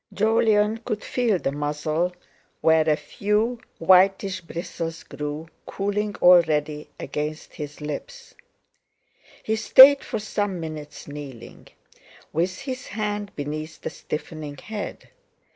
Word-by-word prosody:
Jolyon 215 0 +2
could 215 -2 -4
feel 235 -6 +1
the 135 - -2
muzzle, 150 +4 -1 0.5
where 160 -1 +4
a 150 - +4
few 210 +8 -1 0.2
whitish 190 +2 +4
bristles 165 -1 -5
grew, 150 +2 -5 0.2
cooling 205 +1 -2
already 155 -4 +4
against 150 +1 -4
his 150 -1 -8
lips. 480 - -7 1.1
He 220 - 0
stayed 265 +5 +8
for - - -3
some 205 -3 -2
minutes 155 -2 -7
kneeling; 145 -5 -9 0.7
with 180 - -1
his 260 -2 -5
hand 205 -1 -3
beneath 155 +2 -5
the - - -4
stiffening 150 -1 -6
head. 215 -1 -7
180 Hz, 110 wpm, -24 LUFS, 150-210 Hz, 1.1 s, stayed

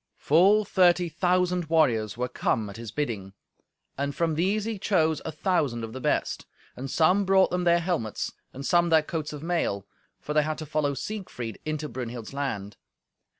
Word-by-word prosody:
Full 195 +8 +4
thirty 180 -2 +3
thousand 180 +1 +1
warriors 120 -10 +2
were 125 0 -1
come 110 -4 -1
at 100 - -10
his 115 -1 -7
bidding, 105 -10 -3 0.7
and 140 0 -2
from 165 -2 +1
these 195 +7 0
he 225 -3 -3
chose 160 -7 +1
a 160 - -3
thousand 145 - 0
of 110 0 -6
the 130 - -6
best. - - -1 0.3
And 135 +2 -6
some 180 +7 +3
brought 190 0 +4
them 180 0 -1
their 170 0 +5
helmets, 165 - -2 0.2
and 135 +1 -8
some 175 +1 +3
their 160 -2 +5
coats 155 -1 -4
of 150 0 -8
mail, 165 - -1 0.3
for 150 - -5
they 150 - +4
had 155 +1 -2
to 155 - -6
follow 150 -1 0
Siegfried 135 - -5
into 155 0 -2
Brunhild's 120 -2 -6
land. 105 -8 -4
155 Hz, 180 wpm, -27 LUFS, 125-175 Hz, 0.7 s, their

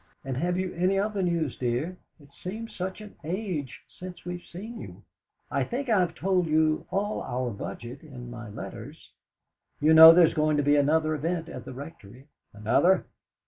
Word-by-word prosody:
"And 135 -1 -3
have 175 +5 0
you 185 0 -2
any 185 +3 +1
other 205 0 0
news, 170 -6 -1
dear? 125 +9 -1 0.2
It 145 -1 -18
seems 220 +5 -7
such 190 +3 -4
an 210 -1 -11
age 165 - -4
since 180 -1 -10
we've 175 0 -5
seen 220 +7 -9
you. - - -11 0.5
I - - +1
think 260 +2 -4
I've 185 -6 +2
told 185 -2 +1
you 155 0 +2
all 200 +3 -1
our 125 -1 -2
budget 120 - -7
in 125 -6 -10
my 120 -2 -8
letters. 105 - -9 0.7
You 155 +2 +4
know 160 +1 +12
there's 165 -1 +5
going 155 -1 +2
to 145 - +2
be 145 +1 +4
another 155 +2 +2
event 165 +2 -2
at - - -8
the 130 - -7
Rectory?" 135 -3 -11 0.3
"Another? 135 - +2
165 Hz, 175 wpm, -27 LUFS, 140-185 Hz, 0.7 s, know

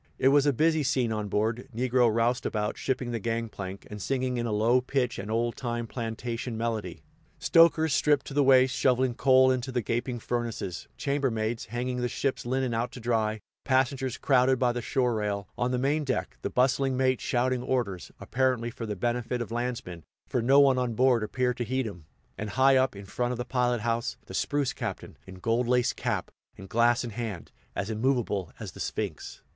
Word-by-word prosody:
It 130 - +4
was 145 +1 +4
a - - +5
busy 160 +4 +2
scene 130 -4 +1
on 105 -1 -2
board 110 +5 -1
negro 125 -1 +3
roustabouts 115 -2 0
shipping 130 -2 -2
the 115 - -2
gang 115 +1 -2
plank, 95 -1 -7
and 105 -1 -8
singing 130 +1 -1
in 120 0 -1
a - - -2
low 115 +4 +3
pitch 125 -1 -1
an 100 +2 -6
old 115 +1 0
time 120 -2 -3
plantation 115 0 -4
melody; 110 -6 -3 0.3
stokers, 160 -2 +4
stripped 145 -1 +2
to - - -7
the 145 - +3
waist, 130 -1 +5
shoveling 130 -1 +2
coal 130 +1 +5
into 130 +1 -2
the 125 -2 -1
gaping 120 +3 -2
furnaces; 115 -6 -4
chambermaids 120 -5 -1
hanging 125 +3 -3
the 125 - +1
ship's 130 0 -2
linen 130 -1 0
out 115 +2 -1
to - - -8
dry; 110 -2 0 0.2
passengers 130 -1 +1
crowded 130 -1 +3
by 125 -1 +2
the 120 0 -3
shore 125 +1 +1
rail, 105 -3 -2
on 125 - 0
the 125 - 0
main 145 +4 +1
deck; 130 -3 -2
the - - -2
bustling 130 +1 +2
mate 130 -1 +2
shouting 125 0 0
orders, 120 -8 -2
apparently 125 -2 0
for 115 0 -6
the 105 - -3
benefit 120 +4 -1
of 120 -2 -5
landsmen, 120 -8 -4 0.2
for 125 - 0
no 135 +4 +5
one 135 -2 +5
on 120 -3 -1
board 125 -1 +4
appeared 125 +3 -1
to 120 - -1
heed 130 +2 -1
him; 90 -7 -8 0.3
and 105 - -3
high 135 +3 +4
up, 130 -3 +2
in 100 0 -9
front 120 +5 -2
of - - -5
the 125 - -3
pilot 125 -2 0
house, 115 +1 -1
the - - -10
spruce 145 -4 0
captain, - - -5
in 95 - -9
gold 115 +6 0
laced 125 0 +2
cap, - - -2 0.3
and 95 - -11
glass 120 +2 +3
in 120 - -5
hand, 110 -5 -5 0.2
as 105 - -2
immovable 110 -5 0
as - - -6
the - - -13
Sphinx. - - -4
120 Hz, 200 wpm, -28 LUFS, 115-130 Hz, 0.3 s, a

